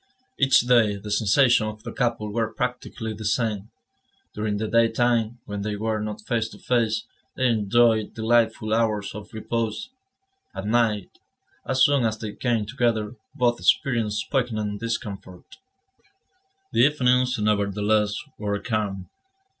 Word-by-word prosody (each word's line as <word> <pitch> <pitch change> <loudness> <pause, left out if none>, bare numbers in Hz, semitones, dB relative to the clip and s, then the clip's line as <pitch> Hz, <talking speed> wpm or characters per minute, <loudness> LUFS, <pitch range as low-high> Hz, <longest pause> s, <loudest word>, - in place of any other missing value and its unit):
Each 135 -1 +5
day, 120 -4 +3
the 105 +1 -8
sensations 110 +1 +3
of 110 0 -15
the 120 - -6
couple 115 -5 -1
were 115 -1 -1
practically 125 -2 -4
the 110 +1 -8
same. 110 -1 -1 0.6
During 105 -1 -2
the 110 +1 -2
daytime, 115 0 +2
when 100 0 -5
they 105 0 -2
were 110 +1 -1
not 105 0 -5
face 115 0 -1
to 105 - -13
face, 115 -1 0 0.3
they 130 - 0
enjoyed 110 0 +2
delightful 110 -1 +1
hours 110 -3 0
of 105 0 -9
repose; 115 - -3 0.7
at 95 - -5
night, 110 -2 0 0.5
as 130 0 +3
soon 140 -3 +4
as 110 -1 0
they 110 -1 -6
came 115 -4 0
together, 115 -2 -1 0.2
both 120 -3 +1
experienced 110 -5 +1
poignant 110 -6 -1
discomfort. 100 -5 -6 1.1
The - - -1
evenings, 125 -2 +3
nevertheless, 105 0 +1 0.2
were 100 -1 -1
calm. 100 -5 -3
110 Hz, 135 wpm, -24 LUFS, 105-120 Hz, 1.1 s, Each